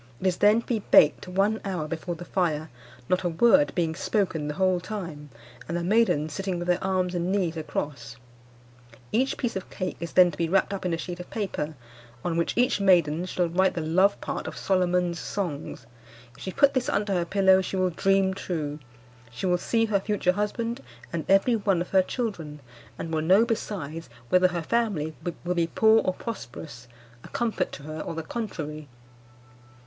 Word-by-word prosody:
It - - -6
is 185 -2 +2
then 210 +3 +5
to - - -19
be 235 -3 0
baked 150 +4 +5
one 200 +4 +1
hour 180 -6 -3
before 165 +2 -4
the 175 - -9
fire, 160 -5 -1 0.4
not 185 - +1
a 175 - +1
word 235 - +4
being 165 -3 0
spoken 175 -4 -1
the 150 - -3
whole 185 -1 +2
time, 170 -7 -6 0.4
and 170 - -2
the 170 - -2
maidens 175 -7 +2
sitting 195 -2 -2
with 175 0 -4
their 180 +1 +1
arms 185 -1 0
and 175 +1 -1
knees 185 -5 0
across. 150 -2 -4 1.0
Each 260 +5 +1
piece 240 - -2
of 190 - -5
cake 185 -1 -4
is 170 -1 -6
then 180 -1 +6
to 145 - -11
be 165 -1 0
wrapped 195 +2 +2
up 190 -2 -3
in 175 - -1
a - - -5
sheet 175 +1 -6
of 180 - -8
paper, 170 -8 -3 0.5
on 175 -2 0
which 170 +5 -1
each 245 -4 +2
maiden 175 -4 +3
shall 180 -1 0
write 190 +3 +2
the 170 - -1
love 185 +6 +3
part - - -4
of - - -6
Solomon's 180 -2 +1
Songs. 155 - -4 0.5
If - - -16
she 190 - -4
put 280 +7 +4
this 260 -2 0
under 205 -1 0
her 175 -2 +1
pillow 190 +1 +4
she 190 - -4
will 185 -1 +1
dream 195 +2 +2
true. 155 -6 -4 0.5
She 120 - -6
will 180 -1 +2
see 225 +4 +1
her 210 -3 +1
future 195 -2 +1
husband 210 +4 -2 0.3
and 165 -2 -2
every 195 +5 +4
one 200 -4 +1
of 175 - -4
her 190 - +5
children, 185 - -4 0.4
and 165 - -5
will 155 - +1
know 190 +8 +5
besides 165 - -4 0.2
whether 185 0 +5
her 175 -2 -3
family 185 -8 -1 0.3
will 180 - +1
be 170 -2 +1
poor 220 +5 +4
or 185 - -1
prosperous, 155 - -8 0.4
a - - -10
comfort 225 -6 -1
to 140 - -8
her 155 +1 -6
or 165 - -5
the 165 - -4
contrary. 155 -8 -5
180 Hz, 195 wpm, -26 LUFS, 165-200 Hz, 1.0 s, then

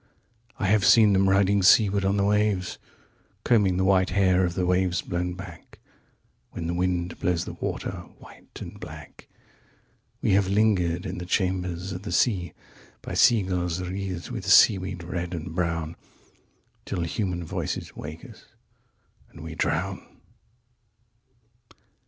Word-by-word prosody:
126I - - -1
have 100 +1 +3
seen 110 -2 +6
them 95 0 +3
riding 100 +1 +3
seaward 100 +1 +5
on 100 +1 +1
the 100 - +2
waves127Combing 105 0 -1
the 95 - +1
white 95 -1 +3
hair 95 -1 +3
of 85 -1 -1
the 90 - 0
waves 90 0 +1
blown 90 0 -3
back128When 85 -1 -13
the 85 - -2
wind 90 -1 -2
blows 90 -2 0
the - - -7
water - - -4 0.3
white - - -15
and - - -9
black.129We - - -10
have 95 0 +3
lingered 95 -5 +1
in 90 -1 -5
the 90 - -6
chambers 90 -1 -1
of 90 -1 -6
the 105 - -7
sea130By 95 - -3
sea 115 -4 +5
girls 90 -2 -2
wreathed 90 -1 -5
with - - -6
seaweed 95 -3 +4
red 85 0 -4
and 85 +1 -6
brown131Till 85 +1 -6
human 90 +1 -3
voices 80 - -4
wake 80 +2 -8
us, - - -16 0.8
and - - -13
we 80 0 -7
drown. - - -3
90 Hz, 130 wpm, -25 LUFS, 85-100 Hz, 0.8 s, seen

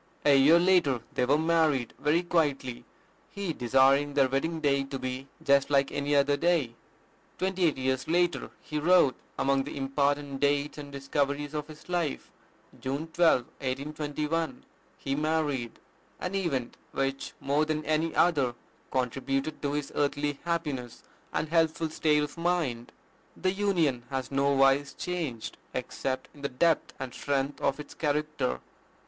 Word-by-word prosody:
A 145 -1 +6
year 140 +5 +7
later 170 -9 +3
they 125 - +1
were 145 +3 +4
married 160 -6 +2
very 155 +4 +2
quietly, 145 -8 0 0.4
he 200 -5 -3
desiring 135 +3 +3
their 135 -2 +5
wedding 150 +5 -1
day 140 -3 +2
to 135 0 -5
be 130 +1 -4 0.2
"just 140 0 +4
like 140 -1 +3
any 145 +1 0
other 140 0 +4
day." 160 -6 +1 0.6
Twenty 190 -1 0
eight 155 - +2
years 130 0 -1
later 175 +1 +1
he 150 - -3
wrote 170 -4 +5 0.2
among 135 0 +2
the 145 - -7
important 140 0 0
dates 145 +1 +1
and 145 -1 -8
discoveries 140 +1 -1
of 150 -1 -3
his 155 -1 -13
life, 175 -5 -2 0.5
"June 140 +5 -3
12, 170 -7 +5 0.5
1821, 150 +2 -2 0.3
he 135 - -3
married, 150 -5 -1 0.4
an 180 - -3
event 150 -11 -2 0.2
which, 135 0 -2
more 145 +2 +1
than 155 0 -2
any 155 +1 0
other, 140 -8 +3 0.3
contributed 135 +3 -1
to 145 -1 -1
his 145 -1 -3
earthly 145 0 0
happiness 150 -8 -3 0.3
and - - -1
healthful 160 -1 +1
state 150 -1 +2
of 150 +3 -6
mind. 165 -9 -1 0.5
The 185 - +1
union 175 -11 +1
has 130 -2 -3
nowise 140 0 +3
changed, 160 -11 -4 0.2
except 130 -1 -3
in 145 - -15
the 140 - -2
depth 160 +5 +1
and 130 -2 -5
strength 140 0 -2
of 140 +1 +1
its 150 - -8
character." 150 - -1
145 Hz, 145 wpm, -29 LUFS, 135-160 Hz, 0.6 s, year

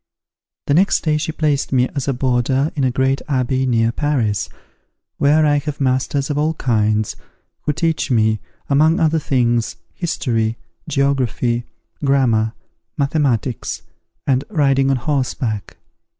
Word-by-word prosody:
The 140 - +1
next 185 +6 +3
day 155 -2 +2
she 150 +1 -2
placed 150 -3 0
me 125 -1 +3
as 140 -2 -3
a - - +2
boarder 130 +3 +1
in 140 - 0
a 130 - +3
great 130 +2 +1
abbey 130 -1 +1
near 115 -2 +2
Paris, 120 -8 0 0.7
where 150 +2 +4
I 145 -1 +3
have 150 0 -5
masters 135 +2 0
of 145 - -1
all 155 +2 +1
kinds, 110 -5 +1 0.5
who 150 - +1
teach 165 0 0
me, 110 -3 +2 0.3
among 155 +4 +3
other 160 0 +2
things, 120 -5 +1 0.2
history, 115 -9 -1 0.3
geography, 125 -4 0 0.4
grammar, 120 -6 +2 0.4
mathematics, 135 -5 -1 0.4
and 135 -1 +2
riding 135 -3 +2
on 135 - +3
horseback. 125 -6 -2
135 Hz, 135 wpm, -19 LUFS, 120-145 Hz, 0.7 s, where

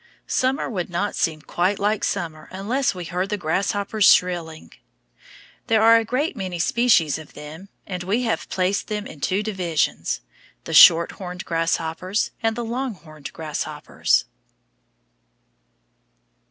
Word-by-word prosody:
Summer 260 +3 0
would 185 -7 -3
not 190 +4 -2
seem 155 -2 -1
quite 185 +5 0
like 210 +1 0
summer 165 -5 -3
unless 215 +7 -1
we 180 - -5
heard 180 +3 -2
the 210 - -1
grasshoppers 200 +4 0
shrilling. 170 -3 0 0.9
There 220 -2 +3
are 230 +1 +7
a 230 - +1
great 265 +7 -1
many 185 -5 -4
species 175 - +3
of 155 - -13
them, 155 +6 -10 0.2
and 180 -2 -5
we 205 +8 0
have 225 - -2
placed 185 +2 0
them 210 -1 -3
in 145 - -11
two 195 +6 0
divisions, 170 - -1 0.4
The 165 - -6
Shorthorned 180 +3 +5
Grasshoppers 165 +3 -1
and 225 -1 +1
The 240 0 -4
Longhorned 210 - -6
Grasshoppers. 155 -2 -1
185 Hz, 130 wpm, -23 LUFS, 165-215 Hz, 0.9 s, are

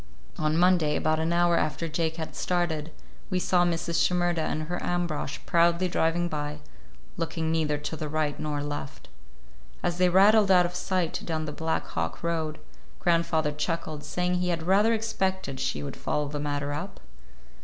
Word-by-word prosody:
On 155 +1 +1
Monday, 175 -4 +4
about 155 0 +1
an 160 +1 0
hour 175 0 +3
after 155 +2 -1
Jake 160 0 -1
had 160 -1 -6
started, 165 -3 -1 0.4
we 185 - 0
saw 180 0 +3
Mrs. 170 -1 +1
Shimerda 175 -2 +1
and 155 0 -1
her 175 +3 -4
Ambrosch 170 -5 -2
proudly 170 +1 +3
driving 175 0 +1
by, 150 -2 -3 0.6
looking 160 -1 -2
neither 155 -2 +1
to 150 +2 -4
the 155 -1 -4
right 155 -1 -1
nor 145 -1 -2
left. 145 -1 -6 0.7
As 175 0 -1
they 180 0 +5
rattled 200 +3 +6
out 180 -2 +6
of 175 - -3
sight 180 -2 -1
down 160 -2 -2
the 150 - -4
Black 160 +1 -2
Hawk - - -4
road, 160 -2 -1 0.4
grandfather 165 -3 +1
chuckled, 155 0 -3
saying 180 0 0
he 180 0 0
had 170 -2 -1
rather 200 +6 +4
expected 190 -10 -2
she 135 - -2
would 70 - -5
follow 150 -1 -1
the 145 +1 -4
matter 145 0 -2
up. 170 +7 -5
165 Hz, 170 wpm, -27 LUFS, 155-175 Hz, 0.7 s, rattled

